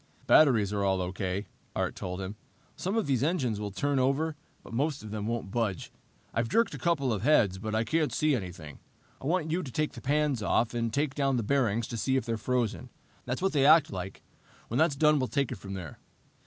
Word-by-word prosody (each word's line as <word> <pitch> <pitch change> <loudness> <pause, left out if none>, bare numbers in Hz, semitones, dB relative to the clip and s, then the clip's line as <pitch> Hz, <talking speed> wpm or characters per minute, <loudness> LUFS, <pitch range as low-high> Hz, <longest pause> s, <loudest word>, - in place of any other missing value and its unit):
"Batteries 115 -10 +5
are 100 -1 0
all 95 -1 +2
okay," 95 +2 -2 0.3
Art - - -1
told 90 +1 -5
him. 95 +2 -5 0.4
"Some 195 +5 -2
of 225 - +1
these 135 -4 +1
engines 135 - 0
will 105 -1 -3
turn 140 +8 0
over, 140 +5 +1 0.3
but - - -11
most 140 +3 -1
of 105 - -8
them 105 -1 -3
won't 115 -4 -3
budge. 110 -6 -2 0.4
I've 115 +1 0
jerked 230 - +2
a - - -6
couple 145 -8 +1
of 100 - -2
heads, 105 -8 +3
but 110 +1 -3
I 110 - +2
can't 155 +5 0
see 155 -2 +2
anything. 90 - -7 0.4
I 135 - -4
want 160 -1 0
you 175 +3 +1
to 140 -7 -7
take 155 +4 -1
the - - -9
pans 145 -3 +1
off 110 +3 +1
and 115 -1 -1
take 140 +3 0
down 135 -3 +1
the 115 - 0
bearings 115 -2 +1
to 115 - -4
see 130 +4 +1
if 130 - -1
they're 115 -2 -1
frozen. 120 0 -1 0.4
That's 130 +8 -3
what 195 - +1
they 140 -3 +3
act 155 +1 +6
like. 95 0 -6 0.5
When 120 - 0
that's 160 -2 +3
done, 150 +1 +4
we'll 130 - 0
take 140 -2 -1
it - - -5
from 100 -1 -7
there." 85 -5 -8
125 Hz, 225 wpm, -29 LUFS, 105-150 Hz, 0.5 s, act